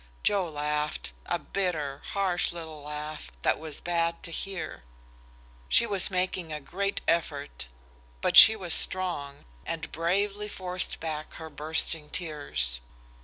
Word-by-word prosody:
Joe 195 -4 +1
laughed, 150 0 -2 0.2
a - - 0
bitter, 155 -8 -3
harsh 190 -3 +1
little 160 -3 -8
laugh, 150 - -7
that - - +2
was 155 -2 -5
bad 170 -1 -1
to 170 - -3
hear. 185 - -5 0.9
She - - +5
was 200 -4 +5
making 185 -3 -1
a 150 - -4
great 200 +7 -2
effort, 145 - -1 0.5
but - - 0
she 220 - +11
was 180 -6 0
strong, 170 -7 +1 0.2
and 160 -3 -5
bravely 200 +5 -1
forced 185 -2 0
back 155 -1 -5
her 160 -1 -9
bursting 155 +1 0
tears. 145 - -2
165 Hz, 130 wpm, -28 LUFS, 150-185 Hz, 0.9 s, she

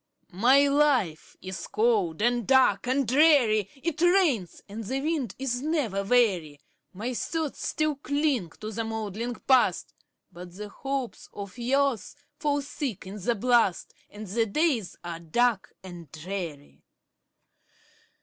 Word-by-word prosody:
My 260 +9 +5
life 275 - +1
is 185 0 -6
cold, 210 -6 +1
and 240 -2 +1
dark, 255 -5 +4
and 260 0 +1
dreary; 250 - +4
It 330 -2 -2
rains, 345 - +2
and 215 +3 -7
the 260 +6 -2
wind 290 - -2
is 255 -2 -2
never 275 - -1
weary; 195 -10 +2 0.3
My 225 +7 -4
thoughts 315 +4 -3
still 310 -2 0
cling 285 - 0
to 215 0 -5
the 225 +1 -3
moldering 220 +2 -4
Past, 260 +2 +2 0.4
But 175 0 -11
the 210 +1 -7
hopes 270 +2 -5
of 200 -2 -8
youth 270 -1 0 0.2
fall 290 -1 0
thick 275 -7 -5
in 195 +2 -8
the 235 +5 +1
blast, 230 -5 +2 0.2
And 210 +1 -9
the 225 +4 0
days 235 - 0
are 170 -1 -6
dark 215 +6 0
and 175 -5 -10
dreary. 160 -3 -7
235 Hz, 135 wpm, -27 LUFS, 195-275 Hz, 0.4 s, My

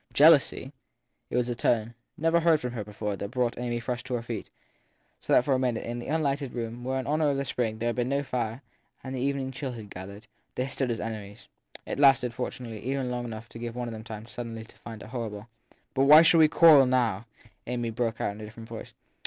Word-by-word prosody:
( - - -25
Jealousy? 145 -3 +5 0.6
It - - -1
was 125 -1 +1
a 120 - -1
tone 115 -1 +1 0.2
never 165 +2 +3
heard 165 -2 +4
from 125 -2 -4
her 115 -3 -4
before 105 0 -4
that 100 +1 -5
brought 120 -1 -1
Amy 120 -1 -2
Frush 120 +1 -3
to 130 -1 -2
her 115 - -3
feet; 115 -4 -5 0.7
so - - -6
that - - +6
for 140 - +2
a 130 - +2
minute, 125 -3 0
in 120 +1 -4
the 120 - -7
unlighted 140 -3 -1
room 120 0 -5
where, 130 +1 -1
in 130 - -4
honour 150 +1 +2
of 140 - 0
the 140 - -1
spring, 115 -4 -1
there 115 +1 -1
had 120 - -2
been 125 0 0
no 140 +1 0
fire 120 -1 -3 0.4
and 130 - -6
the 125 - -3
evening 135 -1 -1
chill 130 -1 -5
had 110 -4 -9
gathered, 100 +4 -9 0.3
they 125 - 0
stood 135 -1 -2
as 115 - -1
enemies. 105 -2 -6 0.4
It - - -4
lasted, 135 -4 +5
fortunately, 120 -2 -5
even 130 0 -1
long 120 0 -3
enough 115 -1 -7
to 115 - -10
give 120 0 -5
one 125 -1 -3
of - - -5
them 110 0 -7
time 110 -1 -8
suddenly 115 -1 -6
to - - -20
find 115 -2 -9
it - - -11
horrible. 110 -3 -5 0.5
But 135 0 +3
why 150 +3 +9
should 165 0 +6
we 155 - +8
quarrel 150 -4 +7
now? 120 -4 +1 0.4
Amy 120 -1 -2
broke 115 -1 -2
out - - 0
in 105 +2 -10
a - - -6
different 110 +2 -11
voice. 115 -1 -8
120 Hz, 245 wpm, -28 LUFS, 115-135 Hz, 0.7 s, why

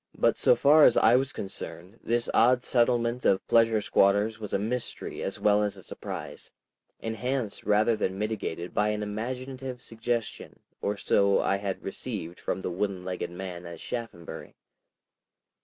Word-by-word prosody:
But - - +2
so - - +5
far 150 +2 +6
as 120 - +6
I 115 - +6
was 135 +1 +1
concerned 95 +1 -7
this 120 0 0
odd 125 +2 +4
settlement 120 0 +1
of 95 -1 +2
pleasure 115 -2 +4
squatters 105 0 +2
was 105 -2 -6
a - - +2
mystery 115 +5 -4
as - - -3
well 105 0 +4
as 105 -1 -1
a - - -12
surprise, - - -7 0.5
enhanced 115 0 -3
rather 105 +2 +3
than 95 -3 -2
mitigated 100 -5 -3
by 105 - +2
an 105 0 -1
imaginative 125 +4 -5
suggestion 115 0 -4 0.2
or 105 0 -1
so 100 0 +3
I 100 - +1
had 100 -1 -4
received 95 -4 -5
from - - -3
the - - -3
wooden 95 0 -2
legged 90 -1 -3
man 90 -1 -7
at 85 -1 -9
Shaphambury. 115 -9 -7
105 Hz, 155 wpm, -28 LUFS, 95-120 Hz, 0.5 s, far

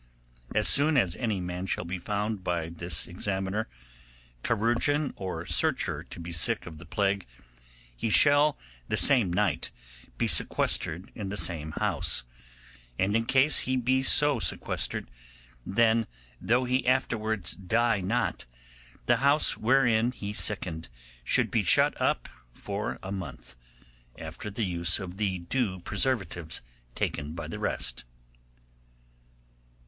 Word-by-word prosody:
'As 105 0 +2
soon 145 +1 +4
as 95 -8 +2
any 110 -6 -1
man 90 +1 -5
shall - - -2
be 90 +2 -4
found 105 +1 -3
by 85 -3 -2
this 85 -1 0
examiner, 95 +3 -3 0.8
chirurgeon, 120 +6 +1
or 90 -3 -5
searcher - - +1
to - - -10
be 85 0 -7
sick 80 -2 +1
of 80 -3 -10
the 85 - -13
plague, 100 -1 -1 0.7
he 85 - -2
shall 145 +5 +5 0.3
the - - 0
same 120 -10 +5
night 90 - 0 0.5
be - - 0
sequestered 85 +4 +1
in 100 -4 -6
the 105 - -4
same 80 -5 0
house; - - 0 0.7
and 100 +3 +1
in 115 0 +1
case 135 +4 +4
he 130 0 0
be 130 +2 +1
so 145 +1 +4
sequestered, - - 0 0.6
then 115 +2 +2 0.3
though 120 +3 +2
he 125 0 0
afterwards 110 -6 +1
die 110 +3 0
not, 115 - -2 0.6
the 120 - +3
house 140 +4 +3
wherein 120 -1 +2
he 105 -4 -6
sickened 90 - -1 0.3
should - - +2
be - - +2
shut - - +3
up - - 0 0.3
for 100 +1 -4
a 95 - -6
month, 95 -9 -7 0.6
after 105 - -7
the 105 +2 -2
use 85 -2 +2
of 95 -1 -7
the 100 -3 -1
due 95 +2 -2
preservatives 85 - -1 0.3
taken 75 +1 -3
by 85 - -6
the - - -7
rest. - - -1
105 Hz, 135 wpm, -28 LUFS, 90-120 Hz, 0.8 s, shall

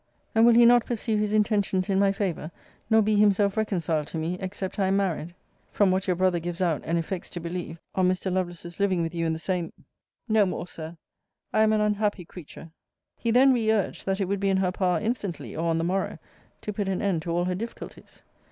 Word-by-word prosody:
And 225 +1 +5
will 235 - +6
he 235 0 +7
not 240 0 +6
pursue 225 -2 -2
his 210 0 0
intentions 205 -3 +1
in 195 -1 +1
my 200 0 +4
favour, 195 -6 -3 0.4
nor 220 -1 +5
be 215 0 +2
himself 205 -1 +3
reconciled 170 -8 -1
to - - -5
me, 160 +3 -2
except 190 +1 -5
I 195 - +2
am 195 +1 +2
married? 175 -3 -2 0.3
From 200 -3 +2
what 190 +2 0
your 180 - +2
brother 185 -1 +2
gives 175 +1 -5
out, 170 -5 +1
and 165 +1 0
effects 170 +2 -4
to 175 - -6
believe, 170 -1 -5 0.2
on 185 -1 +2
Mr. 185 0 -1
Lovelace's 175 -1 -4
living 190 -4 +2
with 165 +1 -3
you 165 -1 -1
in 160 - 0
the - - -3
same 175 +1 -2 0.6
No 215 -3 +3
more, 180 - -4
Sir 165 -1 -9 0.6
I 215 - +3
am 220 0 +4
an 215 -1 +2
unhappy 210 -3 0
creature! 165 -1 -11 0.4
He 235 - -3
then 260 +3 +6
re 225 -3 +2
urged, 210 -3 -1
that 195 +1 0
it 195 - +1
would 200 +1 -2
be 200 0 +1
in 190 - +2
her 185 -1 +1
power 180 -2 +1
instantly, 210 - -4
or 165 +1 -1
on 165 - +1
the 165 - 0
morrow, 185 +3 -1 0.4
to 210 - -4
put 200 -1 -2
an 190 - -2
end 190 -5 +1
to 170 - -6
all 175 +1 +1
her 180 - -1
difficulties. 225 +6 -8
190 Hz, 230 wpm, -26 LUFS, 175-210 Hz, 0.6 s, he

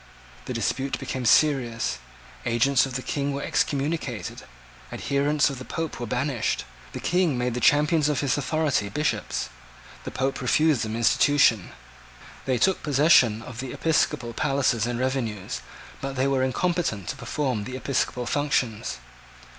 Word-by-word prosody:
The - - -4
dispute 135 0 -1
became 130 -2 -4
serious. 120 - +2 0.4
Agents 125 - +3
of 130 - -8
the 130 - -3
King 140 -1 -2
were 140 - -3
excommunicated. 140 -5 -2 0.5
Adherents 145 +1 +1
of 135 - -7
the - - -7
Pope 160 +2 -4
were 120 - -4
banished. 125 0 -1 0.3
The - - -5
King 175 -6 +1
made 125 0 -1
the 125 - -2
champions 150 +3 +3
of 145 - 0
his 140 -3 +1
authority 145 -7 0
Bishops. 150 +9 -2 0.5
The - - -5
Pope 135 +1 -2
refused 155 -5 +3
them 110 0 -3
institution. 115 -2 +3 0.8
They 130 -2 +1
took 190 +8 +2
possession 135 -7 +4
of 120 -1 -9
the 130 -1 -5
Episcopal 150 -6 0
palaces 125 -4 +1
and 120 -1 -2
revenues: 125 -7 -2 0.4
but 135 0 -4
they 130 +1 +1
were 135 -1 +1
incompetent 130 - -1
to - - -3
perform 125 -3 -2
the 130 - -6
Episcopal 130 -1 -1
functions. 130 -4 -1
135 Hz, 145 wpm, -25 LUFS, 120-145 Hz, 0.8 s, possession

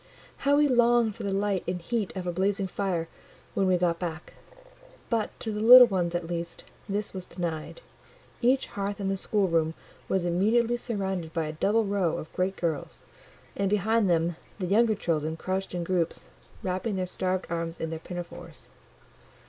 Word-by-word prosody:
How 285 +1 +3
we 295 0 +5
longed 240 -4 +3
for - - -9
the 200 - -2
light 195 -1 0
and 180 0 -1
heat 215 +3 -2
of 185 - -4
a 175 - -1
blazing 195 +2 0
fire 185 -3 -2 0.5
when 195 - +1
we 185 -1 +4
got 170 -1 +1
back! 170 -2 -5 0.8
But, 225 -2 +1
to 220 - -3
the 210 0 -3
little 250 +3 +11
ones 180 -6 -1
at 175 -1 -1
least, 170 0 -5 0.3
this 205 +1 -2
was 185 -2 -6
denied: 170 - -5 0.6
each 260 +2 +3
hearth 200 +1 -4
in 195 -1 -1
the 195 - +1
schoolroom 170 -6 +1 0.3
was 190 -2 +1
immediately 225 +7 +2
surrounded 190 -8 -3
by 165 -2 0
a 155 - -4
double 210 +8 +2
row 195 -5 0
of 155 - -8
great 185 +1 0
girls, 160 -4 -3 0.5
and 200 -1 0
behind 210 +1 +2
them 165 0 +1 0.2
the 190 - -3
younger 215 +4 +3
children 160 -4 -1
crouched 190 +1 -3
in 175 - -2
groups, 170 -1 -1 0.3
wrapping 190 +3 -2
their 185 -1 -1
starved 185 +1 -2
arms 165 0 -3
in 160 - -3
their 160 - -4
pinafores. 175 +1 -9
190 Hz, 175 wpm, -27 LUFS, 170-210 Hz, 0.8 s, little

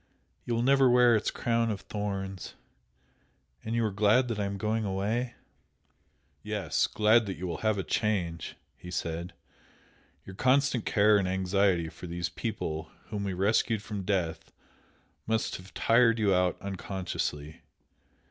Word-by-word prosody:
You 120 - -1
will 115 - 0
never 135 0 +5
wear 120 -1 +6
its 110 - 0
crown 115 -1 0
of 105 -3 -3
thorns! 95 -2 -5 1.1
And 110 +1 -3
you 115 -1 +2
are 110 - -1
glad 110 +5 +3
I 100 - 0
am 100 0 -3
going 110 +2 -1
away?" 105 +5 -2 1.1
"Yes! 105 -6 0
glad 110 +1 +3
that 95 - -3
you 90 - -5
will 85 -2 -4
have 110 -1 +1
a 95 - -1
change" 85 -2 -1 0.2
he 90 - -11
said 85 0 -4 0.9
"Your 95 - -10
constant 130 +1 +2
care 105 0 +4
and 95 - -1
anxiety 95 -2 +1
for 90 - -10
these 85 +1 -3
people 80 -6 -4 0.2
whom 100 -1 -3
we 95 - -2
rescued 105 +3 +1
from 105 -2 -5
death 90 -4 -2 0.8
must 110 0 0
have 95 +2 -14
tired 115 0 +4
you 105 -3 +2
out 90 -1 +1
unconsciously. 90 -6 -4
100 Hz, 150 wpm, -29 LUFS, 90-110 Hz, 1.1 s, wear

